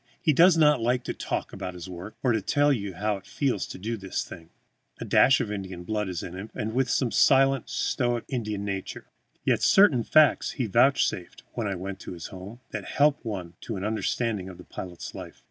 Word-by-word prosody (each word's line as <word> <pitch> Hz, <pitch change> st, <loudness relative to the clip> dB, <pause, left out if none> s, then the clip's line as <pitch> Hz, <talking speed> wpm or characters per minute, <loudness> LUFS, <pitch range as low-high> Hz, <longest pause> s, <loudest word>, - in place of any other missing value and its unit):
He 155 Hz, -, +2 dB
does 170 Hz, +4 st, +6 dB
not 150 Hz, -5 st, +4 dB
like 120 Hz, +2 st, +1 dB
to -, -, -3 dB
talk -, -, -4 dB
about 90 Hz, 0 st, -6 dB
his 90 Hz, 0 st, -8 dB
work 90 Hz, +3 st, -8 dB
or 125 Hz, -3 st, +3 dB
tell 145 Hz, +8 st, +2 dB
you 100 Hz, -6 st, -4 dB
how 105 Hz, +1 st, -1 dB
it 95 Hz, -, -15 dB
feels 130 Hz, -9 st, -1 dB
to -, -, -8 dB
do 110 Hz, +5 st, -4 dB
this 95 Hz, -2 st, -3 dB
thing. 80 Hz, 0 st, -11 dB, 0.5 s
A -, -, -5 dB
dash 135 Hz, -, +5 dB
of 105 Hz, -, -2 dB
Indian 95 Hz, -3 st, -6 dB
blood 105 Hz, +1 st, -2 dB
is 90 Hz, -3 st, -4 dB
in 90 Hz, -, -7 dB
him, 95 Hz, +4 st, -7 dB, 0.2 s
with 130 Hz, 0 st, +1 dB
some 125 Hz, -1 st, +1 dB
of -, -, -9 dB
the -, -, 0 dB
silent, 135 Hz, -2 st, +4 dB
stoic, 120 Hz, -1 st, 0 dB
Indian 105 Hz, -5 st, -3 dB
nature. 95 Hz, -2 st, -5 dB, 0.3 s
Yet -, -, +2 dB
certain 190 Hz, -, +5 dB
facts 155 Hz, +3 st, +4 dB
he 130 Hz, -, -2 dB
vouchsafed, 115 Hz, -5 st, +1 dB
when 115 Hz, -3 st, -2 dB
I 100 Hz, -, -2 dB
went 95 Hz, +1 st, -6 dB
to -, -, -8 dB
his 85 Hz, -2 st, -8 dB
home, 100 Hz, +6 st, -9 dB
that 105 Hz, -3 st, -5 dB
help 145 Hz, +5 st, +2 dB
one 95 Hz, -7 st, -5 dB
to 115 Hz, -, -5 dB
an 95 Hz, -, -5 dB
understanding 110 Hz, -2 st, -1 dB
of 90 Hz, -, -10 dB
the -, -, -11 dB
pilot's 90 Hz, -2 st, -8 dB
life. -, -, -9 dB
110 Hz, 215 wpm, -26 LUFS, 95-130 Hz, 0.5 s, does